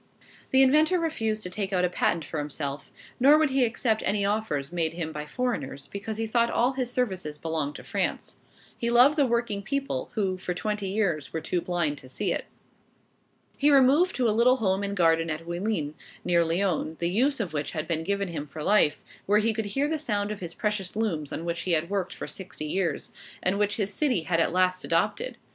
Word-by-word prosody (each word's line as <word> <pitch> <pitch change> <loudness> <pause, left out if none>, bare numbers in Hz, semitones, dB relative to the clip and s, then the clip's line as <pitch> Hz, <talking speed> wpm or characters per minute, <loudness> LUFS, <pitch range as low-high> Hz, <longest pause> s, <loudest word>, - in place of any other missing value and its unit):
The 265 0 +6
inventor 310 +7 +4
refused 225 -10 -1
to 180 - -2
take 195 0 -3
out 180 -1 +2
a - - +1
patent 170 -2 0
for 155 - -4
himself, 145 -1 -4 0.3
nor 280 +4 +7
would 310 -3 +2
he 265 -1 +3
accept 225 -2 0
any 205 0 +1
offers 200 -9 -1
made 165 -2 -1
him 165 -2 -3
by 150 -1 -6
foreigners, 190 - -3
because 205 +2 -4
he 225 - -1
thought 235 +1 +2
all 245 +2 +2
his 255 -2 -2
services 190 -12 -2
belonged 155 -2 -3
to - - -9
France. - - -2 0.4
He 235 - -2
loved 250 +5 +6
the 285 -4 +3
working 235 -4 0
people, 275 - -3
who, 190 -3 0
for 180 -1 -3
twenty 210 +1 -2
years, 190 -8 -1
were 165 - -2
too 175 +2 -1
blind 170 -5 -1
to 130 - -14
see - - -1
it. - - -3 1.1
He 290 - +4
removed 285 +6 +5
to 250 -2 +2
a - - +3
little 240 +3 +5
home 195 -4 +1
and 200 0 -3
garden 165 -1 +3
at 160 +1 -4
Oullins, 170 -3 -2 0.3
near 170 -1 +4
Lyons, 165 -2 0
the 170 - -1
use 260 +8 +2
of 195 -8 -3
which 145 -1 -2
had 155 -1 -3
been 160 -1 -1
given 200 +1 -1
him 150 -3 -5
for 150 +2 -7
life, 200 -6 +3 0.3
where 205 +1 +4
he 220 +1 +2
could 220 0 -2
hear 270 +8 0
the 315 0 -1
sound 205 -7 -1
of 210 - -5
his 170 -2 -6
precious 210 -4 -2
looms 170 -10 -1
on 165 - -4
which 170 0 -2
he 180 - 0
had 165 +3 0
worked 190 -2 -2
for - - -6
sixty 185 -5 -7
years, 175 +3 -2 0.3
and 190 +2 +1
which 205 0 +1
his 205 -2 -1
city 255 - +1
had 165 +1 0
at 165 - +2
last 185 +1 +1
adopted. - - 0
195 Hz, 215 wpm, -27 LUFS, 165-230 Hz, 1.1 s, nor